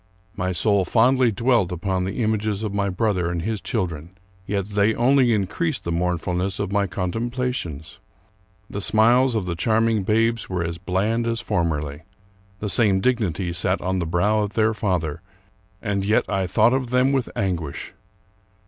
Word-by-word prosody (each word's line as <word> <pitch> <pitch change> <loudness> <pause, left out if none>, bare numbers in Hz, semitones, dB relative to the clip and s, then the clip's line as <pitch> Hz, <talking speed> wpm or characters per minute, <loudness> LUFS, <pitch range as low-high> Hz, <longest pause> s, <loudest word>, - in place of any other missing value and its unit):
My 90 0 -1
soul 100 +2 +2
fondly 125 +4 +3
dwelt 115 -3 +1
upon 90 +1 -1
the 100 +6 -2
images 110 -1 -1
of 105 -2 -3
my 100 -1 0
brother 95 -3 0
and 85 -1 -3
his 110 -1 -2
chil 110 -7 -1
dren; 85 +2 -9 0.3
yet 100 -1 -1
they 105 +1 +1
only 125 0 +4
increased 120 - -1
the 85 - -3
mournfulness 90 +2 -1
of 100 -1 -2
my 100 0 +1
con 90 0 -3
templations. 120 - -4 0.7
The 100 - -5
smiles 115 +5 +4
of 105 -4 -1
the 90 - -2
charming 110 +3 +2
babes 115 +3 +1
were 90 -2 -1
as 85 0 -4
bland 105 +6 0
as 115 0 -1
formerly. 75 -6 -2 0.6
The 105 - -2
same 100 -3 +3
dignity 95 -6 0
sat 90 +2 +1
on 95 0 -1
the 85 - -2
brow 100 +6 +2
of 105 -1 -3
their 110 +1 +2
father, 85 -7 -2 0.6
and 100 -2 -1
yet 105 +3 +2
I 95 -2 -1
thought 115 +6 +3
of 130 -2 -1
them 125 +2 +3
with 135 -3 0
anguish. 90 -4 -3
100 Hz, 170 wpm, -23 LUFS, 90-115 Hz, 0.7 s, only